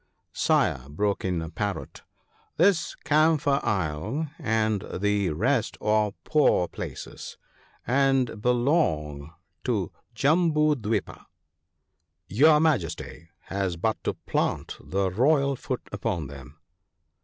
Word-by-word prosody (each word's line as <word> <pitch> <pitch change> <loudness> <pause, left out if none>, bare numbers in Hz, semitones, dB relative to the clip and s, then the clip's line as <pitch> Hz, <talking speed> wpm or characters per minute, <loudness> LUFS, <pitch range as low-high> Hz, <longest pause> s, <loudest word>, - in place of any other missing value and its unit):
' - - -52
Sire/ 65 +1 +2
broke 100 +7 -1
in 90 -3 -1
a 80 - -6
Parrot, 100 +3 -4 0.3
' - - -37
this 180 0 +3
Camphor 150 -2 +3
isle 105 - -2
and 110 - +1
the 105 -1 +1
rest 115 - 0
are 105 -1 +1
poor 145 - +3
places, - - -8 0.5
and 135 -4 +2
belong 105 - +1 0.3
to - - -1 0.2
Jambu 155 0 +3
dwipa. 110 +1 -3 1.0
Your 150 - +5
Majesty 85 - -1
has 95 -3 -3
but 110 +6 -1
to - - -1
plant - - -2
the 95 0 -1
royal 140 - +3
foot 130 0 -5
upon 100 -6 -2
them.' 70 +1 -11
110 Hz, 110 wpm, -26 LUFS, 90-140 Hz, 1.0 s, Your